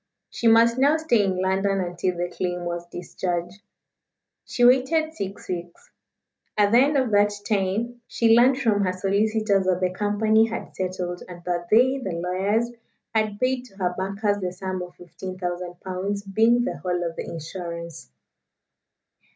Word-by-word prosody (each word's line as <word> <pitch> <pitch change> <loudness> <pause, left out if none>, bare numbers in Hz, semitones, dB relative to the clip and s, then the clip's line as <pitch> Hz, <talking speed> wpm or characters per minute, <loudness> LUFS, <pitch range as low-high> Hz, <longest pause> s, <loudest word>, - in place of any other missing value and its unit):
She 235 - -1
must 230 +2 +5
now 285 +4 +4
stay 280 -10 +2
in 190 -2 -1
London 195 +1 +1
until 180 0 -2
the 175 0 -3
claim 180 -1 -2
was 175 0 -4
discharged. 175 +1 -4 0.8
She 245 - +1
waited 310 +6 +3
six 195 -10 -6
weeks. 175 -1 -7 0.7
At 205 -1 +4
the 235 - +6
end 285 +2 +3
of 260 -4 +1
that 205 0 +4 0.2
time 215 +4 -1
she 225 -1 +3
learned 255 +2 +5
from 220 -6 +2
her 185 -1 0
solicitors 200 +1 +1
that 180 -1 +2
the 185 -1 0
company 215 +2 +2
had 230 +1 -6
settled, 180 -1 -3
and 175 -1 -10
that 175 -1 -2
they, 255 +5 +4
the 190 -9 -4
lawyers, 190 +7 0 0.4
had 215 -2 0
paid 255 0 0
to 195 - -18
her 180 -2 0
bankers 200 +2 -1
the 180 -2 -2
sum 185 0 -4
of 180 0 -8
15,000 180 0 -6
pounds 195 +2 -3
being 225 +5 +3
the 260 - -3
whole 180 -1 -2
of 165 -1 -3
the - - -4
insurance. 170 - -7
195 Hz, 160 wpm, -24 LUFS, 180-225 Hz, 0.8 s, the